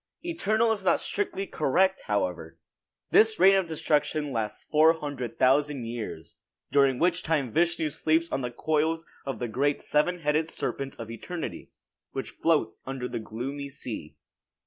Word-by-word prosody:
Eternal 235 - +1
is 210 -3 -1
not - - +3
strictly 195 - -2
correct, 190 +4 +2
however. 90 -5 -2 0.5
This 220 0 +5
reign 190 +2 +8
of 190 -2 +2
destruction 150 -1 0
lasts 110 -3 -3
four 160 +1 +6
hundred 145 -7 -5
thousand 140 0 +3
years, 115 -9 -6 0.3
during 140 -2 +4
which 175 +3 +2
time 150 -7 0
Vishnu 170 +1 +1
sleeps 160 +2 +1
on 135 - -1
the 125 - -2
coils 160 +5 0 0.2
of 135 - -2
the 120 - -3
great 140 +5 0
seven 175 +4 +1
headed 155 +1 +1
serpent 135 -4 -4
of 115 -1 -6
eternity, 165 +9 -6 0.4
which - - -4
floats - - 0
upon 135 0 -6
the 125 -2 -3
gloomy 135 +6 -5
sea. 135 - -7
150 Hz, 150 wpm, -27 LUFS, 125-170 Hz, 0.5 s, reign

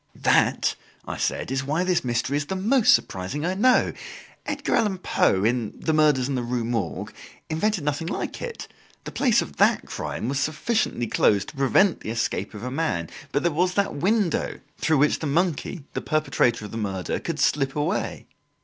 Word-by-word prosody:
"That," - - +2 0.3
I - - -4
said, - - -2
"is 135 0 0
why 155 +6 0
this 185 -1 +1
mystery 120 +2 -1
is 145 0 -1
the 190 - -2
most 220 +6 +4
surprising 95 - -3
I 180 - 0
know. 250 +6 +3 0.5
Edgar - - -2
Allan 210 -4 +1
Poe, 95 - +2
in 115 -1 0
'The 160 - 0
Murders 150 -5 +3
in 140 - -2
the 125 - -1
Rue 120 -1 -2
Morgue,' 110 - -3 0.4
invented 180 +2 0
nothing 150 +2 -2
like - - -4
it. 475 -2 -6 0.4
The - - -7
place 250 -6 +3
of 70 - -12
that - - +3
crime 110 - -4
was 135 +1 -1
sufficiently 155 - 0
closed 100 -3 +2
to - - -13
prevent 150 +8 +3
the - - -7
escape 115 -1 -2
of 105 - -8
a 125 - -4
man; 130 - -2 0.2
but - - 0
there 175 - +2
was 180 +4 +1
that 200 -1 +1
window 190 +4 0 0.2
through 160 -2 +2
which 145 +2 +3
the 155 - -3
monkey, 165 +1 -1
the - - -2
perpetrator 120 -7 +1
of - - -9
the 115 - -5
murder, 95 -4 -2
could 165 -2 -4
slip 135 -2 +1
away! 150 +7 -2
150 Hz, 190 wpm, -24 LUFS, 120-180 Hz, 0.5 s, most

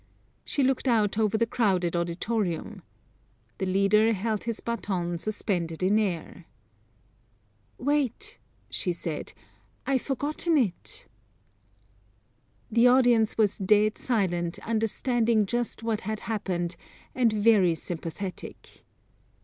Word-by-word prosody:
She 280 - -1
looked 265 +1 +1
out 215 -3 +2
over 220 0 +2
the 230 - +2
crowded 190 -8 +1
auditorium. 180 +2 -2 0.8
The 190 - -1
leader 200 +4 +4
held 215 +1 -2
his 230 -2 -2
baton 180 -7 -2
suspended 180 -5 -2
in 205 +4 +4
air. 175 -4 -3 1.3
"Wait," 280 -2 -1 0.3
she 180 - -1
said. 165 -2 -5 0.5
"I've 265 -2 +1
forgotten 300 +4 0
it." 215 -10 -1 1.7
The 235 +2 +5
audience 245 -3 +4
was 210 -3 +2
dead 210 +2 +3
silent, 175 -8 0
understanding 225 0 +1
just 240 +2 -2
what 225 -2 -1
had 215 +1 -4
happened, 180 -6 -2 0.4
and 245 -3 +3
very 205 -5 +4
sympathetic. 175 +3 -7
215 Hz, 105 wpm, -27 LUFS, 185-230 Hz, 1.7 s, The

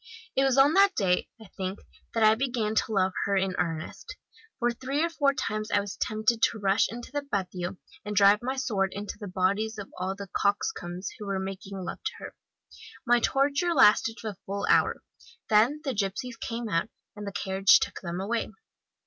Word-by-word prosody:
It 270 - +3
was 270 -1 +2
on 280 +3 +6
that 395 +1 +5
day, 180 -3 +1
I 220 - -12
think, 190 +1 -3 0.4
that 225 - +2
I 215 0 +7
began 235 -3 -1
to 220 - 0
love 190 -2 +2
her 200 0 +1
in 190 -1 0
earnest 170 - -4 0.4
for 240 -2 +1
three 270 +5 -2
or 335 - 0
four 285 -4 +2
times 215 -2 -3
I 205 - +3
was 200 0 -5
tempted 220 +2 0
to - - +3
rush 200 0 +2
into 240 +2 -8
the 290 +1 -1
patio, 180 -2 -3 0.3
and 210 0 -5
drive 200 +1 +6
my 260 +2 -2
sword 210 -8 -1
into 205 +1 -6
the 205 - -6
bodies 200 +4 0
of 200 -2 -8
all 190 +1 -2
the 200 -1 -8
coxcombs 200 - -1
who 210 - -7
were 195 -1 -1
making 195 +1 -6
love 185 - -6
to - - -1
her. - - -9 0.7
My 240 0 +4
torture 285 +8 +1
lasted 225 -3 +5
a 215 -3 -4
full 200 +1 -2
hour; - - +3 0.5
then 235 +8 +4
the 270 -4 -1
gipsies 210 +4 -2
came 230 0 -4
out, 170 +2 0 0.3
and 205 -1 -7
the - - -3
carriage 195 0 +4
took - - -4
them 175 -1 -4
away. 225 +4 -1
210 Hz, 195 wpm, -27 LUFS, 195-240 Hz, 0.7 s, I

